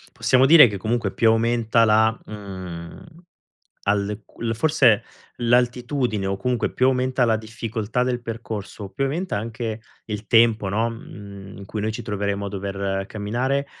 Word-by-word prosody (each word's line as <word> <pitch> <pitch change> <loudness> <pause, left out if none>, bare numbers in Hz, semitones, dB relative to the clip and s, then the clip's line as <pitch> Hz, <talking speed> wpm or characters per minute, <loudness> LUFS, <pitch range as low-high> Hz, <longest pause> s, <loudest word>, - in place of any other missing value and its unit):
Possiamo 130 +1 +4
dire 155 -2 +9
che 105 -3 -3
comunque 115 +5 -1
più 115 - +3
aumenta 115 0 +3
la 110 +1 +4
mhmm, 95 -5 -8 0.8
alle 105 +1 0 0.2
il 115 -1 -1
forse 135 -7 +3 0.3
l'altitudine, 120 -2 +1
o 95 0 -1
comunque 125 +3 -1
più 130 - +2
aumenta 130 -1 +2
la 110 -1 +3
difficoltà 110 +1 -3
del 125 -1 -1
percorso, 110 -3 -6
più 135 - -2
aumenta 160 - -2
anche 115 0 -4 0.3
il 105 -1 -5
tempo, 115 -3 +4
no, 110 +4 0
mhmm, 100 -4 -10
in 100 - -9
cui 105 +2 -5
noi 110 +1 -1
ci - - -6
troveremo 100 -1 -2
a - - -3
dover 100 0 -3
camminare, 125 +7 -2
110 Hz, 150 wpm, -23 LUFS, 100-120 Hz, 0.8 s, dire